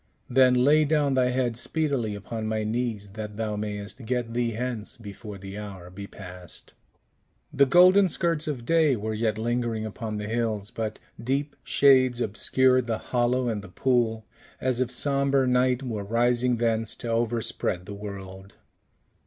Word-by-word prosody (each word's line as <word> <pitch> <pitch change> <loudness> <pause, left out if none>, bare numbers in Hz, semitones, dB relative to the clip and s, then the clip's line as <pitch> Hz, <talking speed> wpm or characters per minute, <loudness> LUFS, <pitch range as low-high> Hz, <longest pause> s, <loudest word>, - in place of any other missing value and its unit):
"Then, 130 0 +5
lay 145 +5 +5
down 150 -2 +2
thy 130 -1 +3
head 125 -2 0
speedily 125 -4 -1
upon 110 +2 -5
my 110 0 -1
knees, 110 -2 -2
that 105 0 -7
thou 110 -1 -2
mayst 105 +3 -5
get 120 0 -2
thee 120 -1 0
hence 115 -2 -4
before 105 -1 -9
the 95 +1 -8
hour 95 -4 -8
be 100 +2 -8
past." 90 -3 -9 0.8
The 140 0 +4
golden 185 +6 +6
skirts 165 -2 0
of 130 -6 -3
day 160 -2 +3
were 110 0 -3
yet 110 0 0
lingering 115 -1 -1
upon 110 0 -5
the 105 - -4
hills, 110 -3 -2
but 110 -1 -4 0.3
deep 140 +4 -1
shades 130 -3 +4
obscured 130 +3 +2
the 115 -2 0
hollow 125 +1 0
and 110 -3 -1
the 100 - -11
pool, 115 0 +1 0.3
as 130 -1 0
if 125 - 0
sombre 140 0 +2
night 125 +1 +2
were 110 -5 -3
rising 120 +3 +1
thence 115 -1 0
to - - -7
overspread 115 -6 -1
the 100 - -7
world. 100 -1 -9
115 Hz, 160 wpm, -26 LUFS, 105-130 Hz, 0.8 s, golden